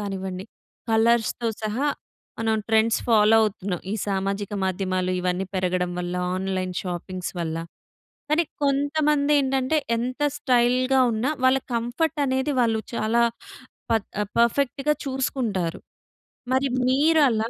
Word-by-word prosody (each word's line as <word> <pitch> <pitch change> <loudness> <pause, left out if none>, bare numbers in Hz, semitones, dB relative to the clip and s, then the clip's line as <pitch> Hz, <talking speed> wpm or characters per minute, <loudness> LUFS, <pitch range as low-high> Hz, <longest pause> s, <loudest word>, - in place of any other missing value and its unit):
కానివ్వండి. 190 -2 -4 0.5
కలర్స్‌తో 230 +1 +2
సహా 230 +7 0 0.5
మనం 225 -1 +1
ట్రెండ్స్ 220 +1 +3
ఫాలో 220 -1 +5
అవుతున్నాం, 200 -4 -2
ఈ - - 0
సామాజిక 195 +1 -2
మాధ్యమాలు 185 -1 -1
ఇవన్నీ 180 +1 -1
పెరగడం 180 -1 0
వల్ల, 175 0 -3 0.2
ఆన్లైన్ 185 -1 -2
షాపింగ్స్ 180 0 -5
వల్ల, 165 -2 -2 0.7
కానీ 315 +3 +3 0.2
కొంతమందేంటంటే 285 -1 +2 0.2
ఎంత 255 +4 -3 0.2
స్టైల్‌గా 255 -1 +2
ఉన్నా, 225 +6 0 0.2
వాళ్ళ 260 +1 +5 0.2
కంఫర్టనేది 265 +3 0
వాళ్ళు 225 -2 +2
చాలా 230 +1 +1 0.7
పత్ 225 -3 +1 0.3
పర్ఫెక్ట్‌గా 275 +4 +2
చూసుకుంటారు. 245 -10 -2 0.7
మరి 265 +1 +2 0.2
మీరలా, 270 -5 +3
225 Hz, 105 wpm, -24 LUFS, 190-265 Hz, 0.7 s, ఫాలో